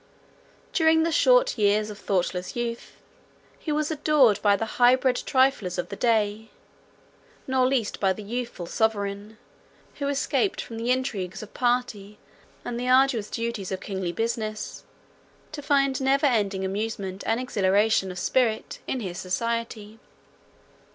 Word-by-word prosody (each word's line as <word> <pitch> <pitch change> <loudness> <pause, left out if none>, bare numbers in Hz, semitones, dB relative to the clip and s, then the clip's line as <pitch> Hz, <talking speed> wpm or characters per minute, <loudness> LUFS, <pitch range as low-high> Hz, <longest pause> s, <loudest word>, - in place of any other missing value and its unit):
During 320 -1 +4
the 335 - 0
short - - +4
years 210 +1 +2
of 205 - -10
thoughtless 180 -1 -2
youth, 235 -1 -4 0.7
he 310 - -4
was 300 +1 0
adored 290 -8 +3
by 205 -1 +4
the 225 - -2 0.2
high 245 +1 +7
bred 260 -1 +1
triflers 260 -9 +1
of 175 - -3
the - - -5
day, 220 -1 0 1.0
nor 260 -1 +2
least 255 -5 -1
by 195 -2 +2
the 210 +3 -5
youthful 235 -4 -5
sovereign, 205 +1 -2 0.6
who 280 - -1
escaped 285 +7 0
from 225 - -6
the 230 +2 -3
intrigues 215 -7 -2
of 215 - -12
party, 240 -5 -1 0.5
and 240 -1 -4
the 250 +1 -2
arduous 255 -4 +3
duties 230 -5 -4
of 190 - -2
kingly 190 -3 -4
business, 220 0 -3 0.7
to 305 -1 -6
find 275 -2 +1
never 275 +2 +2
failing 205 -7 +1
amusement 195 -1 -4
and 225 +1 +1
exhilaration 205 -3 +2
of 180 - -7
spirit 230 +1 0
in 260 - -2
his 180 -4 -5
society. 225 +2 -3
225 Hz, 145 wpm, -25 LUFS, 200-260 Hz, 1.0 s, high